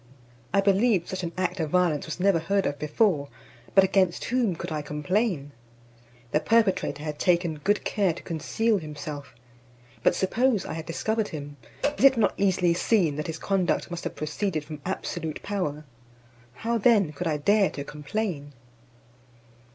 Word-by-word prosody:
I 200 Hz, -, +3 dB
believe 195 Hz, -1 st, +3 dB
such 185 Hz, -, -4 dB
an 170 Hz, -2 st, -3 dB
act 185 Hz, 0 st, -1 dB
of 160 Hz, -2 st, -1 dB
violence 170 Hz, -4 st, +1 dB
was 160 Hz, -, -5 dB
never 190 Hz, -2 st, +3 dB
heard 195 Hz, +4 st, 0 dB
of 145 Hz, -, -2 dB
before; 150 Hz, -2 st, +1 dB, 0.5 s
but 195 Hz, -, +8 dB
against 190 Hz, -2 st, +2 dB
whom 235 Hz, -7 st, +1 dB
could 170 Hz, +1 st, -6 dB
I 155 Hz, -1 st, -2 dB
complain? 150 Hz, +1 st, -1 dB, 0.8 s
The 150 Hz, -, +3 dB
perpetrator 190 Hz, -7 st, +1 dB
had 150 Hz, -1 st, -5 dB
taken 170 Hz, -3 st, +1 dB
good 205 Hz, +7 st, +1 dB
care 200 Hz, -4 st, +2 dB
to 165 Hz, -, -9 dB
conceal 210 Hz, +6 st, 0 dB
himself. 145 Hz, -4 st, -7 dB, 0.7 s
But -, -, +3 dB
suppose 225 Hz, +2 st, +1 dB
I -, -, -5 dB
had 160 Hz, 0 st, -6 dB
discovered 220 Hz, +6 st, -1 dB
him, 145 Hz, -2 st, -7 dB, 0.4 s
is -, -, 0 dB
it 270 Hz, -2 st, +7 dB
not 225 Hz, -, +3 dB
easily 185 Hz, -3 st, +2 dB
seen 175 Hz, -4 st, +2 dB
that 150 Hz, -, -3 dB
his 160 Hz, -1 st, -4 dB
conduct 185 Hz, -1 st, 0 dB
must 175 Hz, -1 st, -5 dB
have -, -, -4 dB
proceeded 155 Hz, +1 st, -2 dB
from 150 Hz, -1 st, -8 dB
absolute 165 Hz, -4 st, -4 dB
power? 155 Hz, -7 st, -3 dB, 0.7 s
How 230 Hz, -, -1 dB
then 205 Hz, -8 st, +4 dB
could 175 Hz, +4 st, -3 dB
I 155 Hz, -2 st, +1 dB
dare 200 Hz, +6 st, +3 dB
to 140 Hz, -, -6 dB
complain? 150 Hz, -1 st, -4 dB
175 Hz, 165 wpm, -26 LUFS, 150-200 Hz, 0.8 s, but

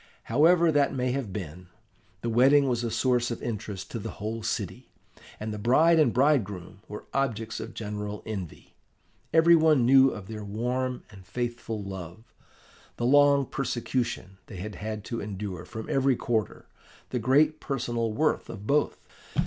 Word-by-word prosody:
However 165 Hz, +7 st, +4 dB
that 145 Hz, -2 st, +2 dB
may 125 Hz, -1 st, 0 dB
have 125 Hz, -6 st, -3 dB
been, 90 Hz, -2 st, -7 dB, 0.6 s
the 120 Hz, -, -1 dB
wedding 135 Hz, +4 st, +5 dB
was 120 Hz, -2 st, 0 dB
a 115 Hz, -, -1 dB
source 125 Hz, 0 st, +1 dB
of 120 Hz, -, -5 dB
interest 105 Hz, -4 st, -5 dB
to 115 Hz, -, -4 dB
the -, -, -6 dB
whole 110 Hz, +2 st, -4 dB
city, 110 Hz, 0 st, -4 dB, 0.5 s
and 110 Hz, 0 st, -4 dB
the 105 Hz, -, -5 dB
bride 160 Hz, +9 st, +4 dB
and 150 Hz, -6 st, +4 dB
bridegroom 110 Hz, -, +1 dB
were 105 Hz, -, -8 dB
objects 115 Hz, -5 st, -1 dB
of -, -, -7 dB
general 105 Hz, -1 st, -5 dB
envy. 95 Hz, -7 st, -7 dB, 0.6 s
Every 165 Hz, +2 st, +6 dB
one 155 Hz, -6 st, +4 dB
knew 135 Hz, +1 st, +7 dB
of 105 Hz, -6 st, -8 dB
their 105 Hz, 0 st, -6 dB
warm 125 Hz, +5 st, -2 dB
and 95 Hz, -2 st, -13 dB
faithful 120 Hz, -1 st, -4 dB
love, 95 Hz, +1 st, -8 dB, 0.7 s
the 120 Hz, -, -1 dB
long 140 Hz, +1 st, +5 dB
persecution 120 Hz, -7 st, -3 dB
they 100 Hz, -, -9 dB
had 105 Hz, +4 st, -6 dB
had 105 Hz, +2 st, -5 dB
to 115 Hz, -, -4 dB
endure 100 Hz, -4 st, -5 dB
from 110 Hz, +4 st, -7 dB
every 135 Hz, -1 st, +2 dB
quarter, 110 Hz, -4 st, -2 dB, 0.5 s
the 125 Hz, -, -1 dB
great 150 Hz, +6 st, +3 dB
personal 120 Hz, -4 st, -2 dB
worth 155 Hz, +8 st, 0 dB
of 105 Hz, -2 st, -8 dB
both. 145 Hz, +4 st, 0 dB
115 Hz, 160 wpm, -27 LUFS, 105-135 Hz, 0.7 s, knew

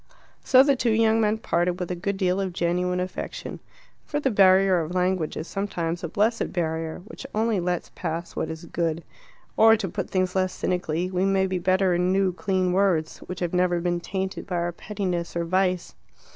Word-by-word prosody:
So 260 Hz, 0 st, +7 dB
the 280 Hz, 0 st, +3 dB
two 245 Hz, -2 st, 0 dB
young 225 Hz, 0 st, +3 dB
men 215 Hz, 0 st, +2 dB
parted 175 Hz, -3 st, 0 dB
with 180 Hz, -1 st, -3 dB
a -, -, -1 dB
good 195 Hz, +3 st, -3 dB
deal 185 Hz, 0 st, +1 dB
of 190 Hz, -2 st, -3 dB
genuine 180 Hz, +1 st, 0 dB
affection. 180 Hz, 0 st, -5 dB, 0.4 s
For 295 Hz, -, -2 dB
the 270 Hz, -3 st, 0 dB
barrier 190 Hz, -2 st, +5 dB
of 165 Hz, +3 st, -5 dB
language 180 Hz, -3 st, 0 dB
is 160 Hz, -, -5 dB
sometimes 175 Hz, -4 st, -3 dB
a -, -, -1 dB
blessed 215 Hz, +7 st, 0 dB
barrier, 160 Hz, -1 st, -3 dB
which 240 Hz, -, -10 dB
only 220 Hz, -2 st, +1 dB
lets 175 Hz, 0 st, -2 dB
pass 170 Hz, 0 st, -4 dB
what -, -, -2 dB
is 160 Hz, +1 st, -7 dB
good. 165 Hz, 0 st, -2 dB, 0.5 s
Or 225 Hz, 0 st, +6 dB
to 205 Hz, -2 st, -3 dB
put -, -, -4 dB
the -, -, -26 dB
thing 185 Hz, -1 st, +2 dB
less 185 Hz, -1 st, 0 dB
cynically 180 Hz, 0 st, -2 dB
we 185 Hz, 0 st, 0 dB
may 195 Hz, 0 st, +2 dB
be 185 Hz, -1 st, -1 dB
better 185 Hz, +1 st, +2 dB
in 180 Hz, +1 st, +1 dB
new 190 Hz, -1 st, +2 dB
clean 185 Hz, 0 st, 0 dB
words, 180 Hz, -5 st, +1 dB
which 180 Hz, 0 st, -6 dB
have 175 Hz, -1 st, -2 dB
never 180 Hz, -1 st, +2 dB
been 175 Hz, 0 st, -1 dB
tainted 190 Hz, +2 st, -4 dB
by 180 Hz, -, -3 dB
our 175 Hz, 0 st, 0 dB
pettiness 180 Hz, -2 st, -4 dB
or 170 Hz, 0 st, -1 dB
vice. 185 Hz, 0 st, 0 dB
185 Hz, 200 wpm, -25 LUFS, 175-195 Hz, 0.5 s, So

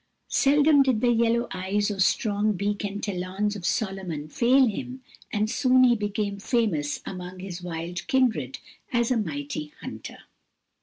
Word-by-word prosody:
Seldom 290 Hz, +1 st, +5 dB
did 260 Hz, -5 st, +2 dB
the 240 Hz, +1 st, +3 dB
yellow 235 Hz, +1 st, +2 dB
eyes 195 Hz, +3 st, -1 dB
or 200 Hz, -, -5 dB
strong 210 Hz, +2 st, +2 dB
beak 205 Hz, +2 st, -2 dB
and 205 Hz, 0 st, -4 dB
talons 195 Hz, +2 st, -2 dB
of 180 Hz, -3 st, -4 dB
Solomon 190 Hz, -8 st, -2 dB
fail 255 Hz, -, +4 dB
him, 255 Hz, +3 st, -4 dB, 0.3 s
and 210 Hz, 0 st, +1 dB
soon 255 Hz, +2 st, +4 dB
he 245 Hz, -1 st, +5 dB
became 205 Hz, -1 st, -2 dB
famous 200 Hz, -, 0 dB
among 180 Hz, 0 st, -7 dB
his 185 Hz, -1 st, -7 dB
wild 175 Hz, 0 st, -5 dB
kindred 220 Hz, -, +1 dB, 0.3 s
as 235 Hz, -1 st, +1 dB
a 250 Hz, -, +3 dB
mighty 150 Hz, -5 st, -4 dB
hunter. -, -, -8 dB
205 Hz, 150 wpm, -26 LUFS, 185-240 Hz, 0.3 s, Seldom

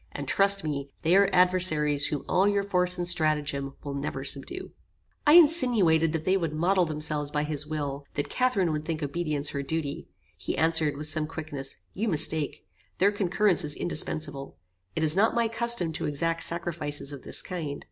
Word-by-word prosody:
And -, -, -6 dB
trust 195 Hz, 0 st, +2 dB
me, 140 Hz, -2 st, -4 dB
they 170 Hz, +3 st, +3 dB
are 200 Hz, 0 st, +4 dB
adversaries 165 Hz, -6 st, +3 dB
whom 150 Hz, -, -4 dB
all 190 Hz, +2 st, +2 dB
your 200 Hz, -1 st, +1 dB
force 180 Hz, -2 st, +1 dB
and 175 Hz, 0 st, -2 dB
stratagem 150 Hz, -5 st, 0 dB
will 145 Hz, -1 st, -5 dB
never 140 Hz, -1 st, -4 dB
subdue." 145 Hz, -, -3 dB, 0.6 s
I 295 Hz, -, +7 dB
insinuated 240 Hz, -, +5 dB
that 160 Hz, -1 st, -3 dB
they 190 Hz, +1 st, +2 dB
would 165 Hz, -5 st, -3 dB
model 180 Hz, +4 st, +1 dB
themselves 150 Hz, -2 st, -3 dB
by 150 Hz, 0 st, -1 dB
his 150 Hz, 0 st, -3 dB
will: 145 Hz, -2 st, -4 dB
that 145 Hz, -, -2 dB
Catharine 245 Hz, -9 st, 0 dB
would 150 Hz, -1 st, -3 dB
think 160 Hz, -1 st, -4 dB
obedience 150 Hz, -1 st, -2 dB
her 140 Hz, -, -4 dB
duty. 145 Hz, 0 st, -4 dB, 0.3 s
He -, -, -5 dB
answered, 160 Hz, -1 st, +2 dB
with 150 Hz, -, -3 dB
some 155 Hz, 0 st, +2 dB
quickness, 150 Hz, -4 st, -4 dB, 0.2 s
"You 220 Hz, +4 st, -3 dB
mistake. 155 Hz, -4 st, 0 dB, 0.3 s
Their 200 Hz, +2 st, +3 dB
concurrence 195 Hz, -2 st, +1 dB
is 150 Hz, -1 st, 0 dB
indispensable. 145 Hz, -, -4 dB, 0.4 s
It -, -, -1 dB
is 155 Hz, +1 st, +5 dB
not 220 Hz, +4 st, +2 dB
my 235 Hz, -1 st, +2 dB
custom 225 Hz, -7 st, +2 dB
to 155 Hz, -, -3 dB
exact 165 Hz, +3 st, -2 dB
sacrifices 155 Hz, -4 st, -2 dB
of 140 Hz, -, -9 dB
this -, -, -2 dB
kind. 155 Hz, -6 st, -5 dB
160 Hz, 180 wpm, -26 LUFS, 150-185 Hz, 0.6 s, I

